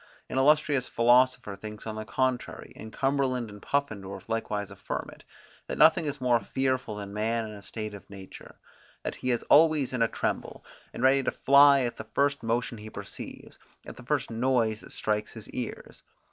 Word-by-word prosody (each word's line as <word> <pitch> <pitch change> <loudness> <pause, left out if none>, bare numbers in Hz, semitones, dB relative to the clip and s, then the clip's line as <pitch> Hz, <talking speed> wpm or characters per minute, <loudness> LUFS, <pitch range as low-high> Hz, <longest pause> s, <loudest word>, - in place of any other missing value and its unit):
An 130 - 0
illustrious 145 -2 +3
philosopher 120 -3 +3
thinks 105 +2 -9
on 110 - -4
the 110 0 -5
contrary, 125 +4 -2
and 110 - -9
Cumberland 130 -4 0
and 105 0 -12
Puffendorff 100 -9 -3
likewise 105 -3 -2
affirm - - -5
it, - - -18 0.4
that - - -4
nothing 160 0 +5
is 145 0 -3
more 125 -2 +3
fearful 130 -3 -1
than 100 -1 -7
man 110 +2 -1
in 110 - -7
a 105 -1 -10
state 105 +1 -6
of 100 - -12
nature, 95 -1 -11 0.5
that - - -4
he 130 - -3
is 120 -2 +1
always 155 -4 +4
in 125 - -1
a 115 - +5
tremble, - - -3 0.3
and 120 - -6
ready 135 +1 +5
to - - 0
fly 140 0 +6
at 120 -2 -2
the - - -8
first 140 0 +2
motion 115 0 -1
he 110 +1 -9
perceives, - - -9 0.3
at - - -9
the - - -12
first - - -1
noise 115 -2 +1
that - - -14
strikes 105 0 -2
his 110 -3 -8
ears. 125 -2 -6
120 Hz, 190 wpm, -28 LUFS, 110-135 Hz, 0.5 s, fly